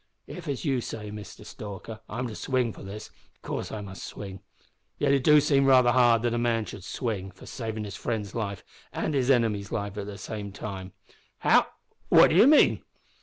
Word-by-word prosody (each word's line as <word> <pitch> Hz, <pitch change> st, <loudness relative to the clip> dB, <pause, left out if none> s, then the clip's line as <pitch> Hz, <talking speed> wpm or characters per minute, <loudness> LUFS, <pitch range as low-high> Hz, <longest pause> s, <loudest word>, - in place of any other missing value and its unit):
If, 175 Hz, -2 st, -9 dB
as 140 Hz, 0 st, -3 dB
you 135 Hz, -4 st, +1 dB
say, 105 Hz, -2 st, -6 dB
Mister 105 Hz, 0 st, -9 dB
Stalker, 105 Hz, +1 st, -8 dB
I'm 120 Hz, +4 st, -3 dB
to 115 Hz, -, -7 dB
swing 125 Hz, -3 st, 0 dB
for -, -, -12 dB
this, 100 Hz, +2 st, -8 dB, 0.2 s
of -, -, -38 dB
course -, -, -4 dB
I 110 Hz, -, -5 dB
must 95 Hz, -2 st, -8 dB
swing. 95 Hz, -2 st, -7 dB, 0.6 s
Yet 140 Hz, -, +2 dB
it 135 Hz, -2 st, +2 dB
do 150 Hz, +1 st, +7 dB
seem 140 Hz, -2 st, +3 dB
raither 130 Hz, -2 st, +6 dB
hard 120 Hz, -2 st, +4 dB
that 120 Hz, -1 st, +1 dB
a 120 Hz, -, 0 dB
man 115 Hz, -2 st, +1 dB
should 95 Hz, -, -9 dB
swing 105 Hz, -3 st, -3 dB
for 95 Hz, -1 st, -15 dB
savin' 110 Hz, -2 st, -5 dB
his 100 Hz, -2 st, -6 dB
friend's 105 Hz, -4 st, -3 dB
life 100 Hz, -4 st, -4 dB, 0.3 s
an' 155 Hz, -, -2 dB
his 135 Hz, -2 st, +1 dB
enemy's 110 Hz, -6 st, +2 dB
at 100 Hz, -2 st, -3 dB
the 100 Hz, 0 st, -6 dB
same 105 Hz, 0 st, -6 dB
time." 95 Hz, -3 st, -7 dB, 0.4 s
"How -, -, +4 dB, 0.4 s
what -, -, +7 dB
do -, -, +2 dB
you 210 Hz, +7 st, +7 dB
mean?" 300 Hz, +1 st, +5 dB
110 Hz, 200 wpm, -27 LUFS, 100-130 Hz, 0.6 s, do